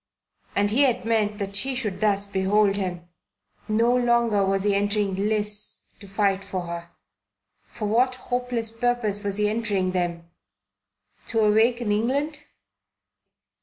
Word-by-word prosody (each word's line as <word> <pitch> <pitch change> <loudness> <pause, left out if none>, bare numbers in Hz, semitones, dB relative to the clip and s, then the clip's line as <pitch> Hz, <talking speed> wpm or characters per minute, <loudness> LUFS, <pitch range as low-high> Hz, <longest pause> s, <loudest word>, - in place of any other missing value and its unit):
And 205 0 +2
he 250 +6 +3
had 250 -4 +2
meant 215 -2 +1
that 200 -1 -4
she 265 +6 +2
should 215 -7 -3
thus 205 -2 +2
behold 200 +1 +2
him. 180 -3 -4 0.6
No 230 +3 +2
longer 235 -4 +2
was 195 0 0
he 205 -1 +2
entering 205 0 0
lists 210 +1 -1
to 200 - -12
fight 195 0 0
for 190 -2 -4
her. 170 0 -6 0.8
For 215 - -5
what 250 +4 +2
hopeless 245 -3 -3
purpose 225 -3 -1
was 200 -1 -1
he 210 0 +2
entering 210 -4 0
them? 175 -2 -2 1.0
To 225 -2 +1
awaken 220 +2 +3
England? 280 +8 -1
210 Hz, 135 wpm, -24 LUFS, 195-235 Hz, 1.0 s, he